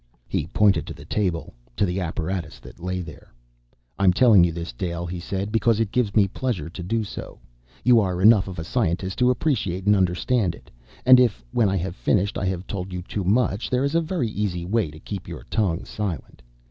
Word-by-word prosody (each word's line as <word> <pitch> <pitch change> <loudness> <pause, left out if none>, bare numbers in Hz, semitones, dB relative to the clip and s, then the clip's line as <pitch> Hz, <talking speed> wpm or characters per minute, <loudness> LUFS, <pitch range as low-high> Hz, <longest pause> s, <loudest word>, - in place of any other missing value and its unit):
He - - -2
pointed 100 +2 +2
to - - -7
the - - -12
table, 90 -6 -2 0.2
to 105 - +2
the 90 0 -2
apparatus 85 0 -3
that - - -14
lay 90 +1 -3
there. 80 -4 -11 0.7
"I'm 95 -2 +5
telling 110 -4 +6
you 85 - +2
this, 85 -5 -6
Dale," 85 +6 -3
he 90 +1 -5
said, 95 +3 -3
"because 115 0 +2
it 110 -3 0
gives 120 -5 0
me 105 -3 +5
pleasure 105 -5 -3
to 90 - -7
do 110 +6 -1
so. 105 - -8 0.5
You 125 -2 +6
are 90 -4 0
enough 105 0 +6
of 95 - -7
a 80 - -3
scientist 95 -1 -1
to 125 0 +4
appreciate 115 - 0
and 105 0 +5
understand 95 +1 +1
it. - - -18 0.3
And 130 0 +9
if, 110 - +2
when 110 -4 +2
I 95 - 0
have 90 0 -3
finished, 100 +1 +1
I - - -2
have 95 0 -3
told 95 -1 -5
you 90 0 -5
too 100 +2 -4
much, 105 +2 +1
there 125 +1 +1
is 140 +2 0
a 165 - +3
very 160 - -2
easy 95 -5 -2
way 105 -2 0
to 75 +1 -12
keep 100 +3 -7
your - - -8
tongue 95 -6 0
silent. 100 -6 -5
95 Hz, 215 wpm, -24 LUFS, 90-115 Hz, 0.7 s, And